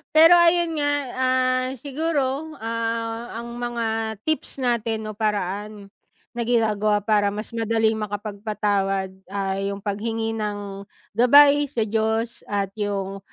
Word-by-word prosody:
Pero 330 +2 +9
ayun 340 -1 +3
nga, 290 0 +1 0.3
ah, 255 0 +2
siguro, 295 +1 -2
ah, 230 +1 -3
ang 235 0 -8
mga 225 -2 -2
tips 310 -3 -2
natin 225 -3 -1
o 215 - -7
paraan 205 -1 -3 0.4
na 240 - -2
ginagawa 215 -3 +2
para 210 -1 +3
mas 215 +3 -6
madaling 225 -1 +1
makapagpatawad 205 -2 -2 0.2
ay 195 0 -2
yung 200 0 -7
paghingi 225 +2 -2
ng 205 -2 -4 0.3
gabay 285 +4 +6
sa 235 -5 -1
Diyos 220 +2 -1
at 200 -1 -1
yung 195 -1 -2
225 Hz, 120 wpm, -23 LUFS, 205-245 Hz, 0.4 s, Pero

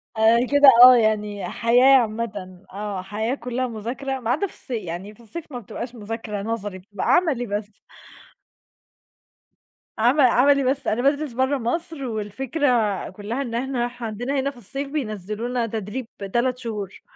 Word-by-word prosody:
آآ، 220 +1 +5
كده 285 -1 +8
آه 255 0 +11
يعني، 210 -3 0
حياة 240 +2 +3 0.2
عامةً، 205 -5 -5
آه، 200 -2 -4
حياة 215 +6 -2
كلّها 250 0 -3
مذاكرة، 245 +4 -4
ما 235 -2 -4
عدا 325 +10 0
في - - -15
الص - - -13
يعني 195 -2 -5
في - - -26
الصيف 305 +7 -9
ما 245 - -5
بتبقاش 235 +3 -7
مذاكرة 215 -1 -5
نظري، 205 -3 -4
بتبقى 200 +1 -6
عملي 305 -9 +1
بس. 205 0 -4 2.3
عم 250 +6 +4
عملي 270 +2 +5
بس، 265 0 0
أنا 225 +3 +1
بادرس 285 0 +1
برا 260 +3 +1
مصر، 280 +5 -3
والفكرة 250 +7 -2 0.4
كلها 210 +7 -5
إن 235 -4 -4
إحنا 245 -1 -1
ح 245 0 -11
عندنا 245 +5 -2
هنا 275 +1 -1
في 260 - -19
الصيف 275 +6 -5
بينزلونا 230 -2 -3
تدريب 220 +3 -5 0.3
3 250 +1 +1
شهور. 210 -6 -6
235 Hz, 155 wpm, -23 LUFS, 210-265 Hz, 2.3 s, آه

